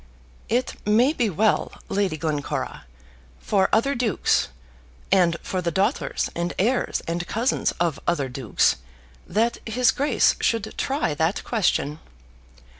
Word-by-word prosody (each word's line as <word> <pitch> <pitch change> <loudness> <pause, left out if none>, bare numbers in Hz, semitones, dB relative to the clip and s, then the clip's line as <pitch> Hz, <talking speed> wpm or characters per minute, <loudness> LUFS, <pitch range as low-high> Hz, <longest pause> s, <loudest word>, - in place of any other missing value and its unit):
"It 245 +3 0
may 235 +8 +4
be 240 -8 +1
well, 205 +4 +1 0.2
Lady 195 -5 0
Glencora, 150 - -3 0.5
for 190 - +1
other 255 +6 +3
dukes, 240 -4 +1 0.6
and 175 -3 +4
for 185 - -2
the 170 - 0
daughters 190 +3 0
and 170 +1 -2
heirs 245 +7 0
and 170 +2 -2
cousins 235 +4 0
of 170 -4 -1
other 155 -6 +1
dukes, 125 -4 +1 0.5
that 225 +5 +1
his 235 +2 +2
Grace 285 +2 +2
should 220 -2 0
try 275 - -1
that 160 +6 0
question. 170 - 0
195 Hz, 125 wpm, -24 LUFS, 170-230 Hz, 0.6 s, may